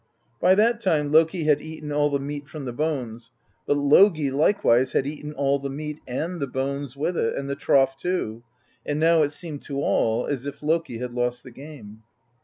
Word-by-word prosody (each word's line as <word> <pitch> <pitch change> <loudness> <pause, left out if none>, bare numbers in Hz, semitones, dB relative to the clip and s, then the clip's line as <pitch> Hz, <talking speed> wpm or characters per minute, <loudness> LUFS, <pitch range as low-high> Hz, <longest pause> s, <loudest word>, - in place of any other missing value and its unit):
By 185 +2 +5
that 230 +3 +2
time 155 -8 +1
Loki 160 +2 +3
had 150 -1 +3
eaten 155 -1 -7
all 145 0 +2
the 140 - 0
meat 145 +1 -6
from 145 -1 -8
the 125 - -4
bones, 125 -6 -3 0.4
but 145 - +2
Logi 150 +1 +4
likewise 135 - +2
had 135 - +1
eaten 150 +1 -6
all 140 -1 0
the 140 0 -5
meat, 150 +2 -6
and 165 +8 -3
the 140 - -2
bones 140 +1 -4
with 170 +5 -1
it, 115 - 0
and 140 - -4
the 140 - -2
trough 135 -1 +2
too; 135 -7 -3 0.4
and 145 0 -2
now 165 0 +4
it 145 -1 +1
seemed 150 -2 -7
to 140 -1 -4
all 115 -4 +1
as 140 -1 -3
if 140 +1 -8
Loki 160 -5 0
had 125 0 -5
lost 125 0 -2
the 130 - -12
game. 120 -6 -12
145 Hz, 205 wpm, -24 LUFS, 135-155 Hz, 0.4 s, By